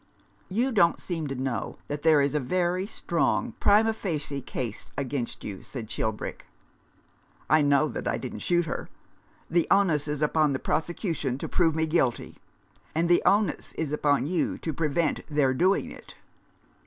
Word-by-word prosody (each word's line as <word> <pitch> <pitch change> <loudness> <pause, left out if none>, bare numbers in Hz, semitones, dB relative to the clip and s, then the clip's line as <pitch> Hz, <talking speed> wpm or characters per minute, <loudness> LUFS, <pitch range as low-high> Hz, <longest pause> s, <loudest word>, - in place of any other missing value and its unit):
"You 240 +8 +1
don't 170 -7 +3
seem 165 -4 -3
to 135 - -4
know 130 -4 -3
that 145 0 -4
there 155 -2 +5
is 140 0 +1
a 150 - +2
very 180 +6 0
strong 220 +4 0
primd 220 +2 +5
facie 150 -9 -3
case 115 -5 -5
against 135 -3 -3
you," 100 -2 -6
said 115 -5 -7
Chil 110 0 0
brick. 105 - -7 0.5
" - - -35
I 155 0 +6
know 145 +1 +3
that - - -5
I - - 0
didn't - - -6
shoot 175 -1 +1
her. - - -5 0.6
The 170 0 +2
onus 170 -7 +3
is 150 0 -1
upon 150 -1 +2
the - - 0
prosecution 160 - -2
to - - -5
prove 165 -3 +2
me 160 0 +1
guilty." 155 -7 0 0.6
"And 170 +2 +1
the 175 - +5
onus 205 +1 +2
is 155 -2 -3
upon 145 -2 +2
you 170 +3 0
to 160 - -4
prevent 155 +1 0
their 145 -4 +2
doing 185 +9 +2
it." - - -12
155 Hz, 170 wpm, -27 LUFS, 140-175 Hz, 0.6 s, I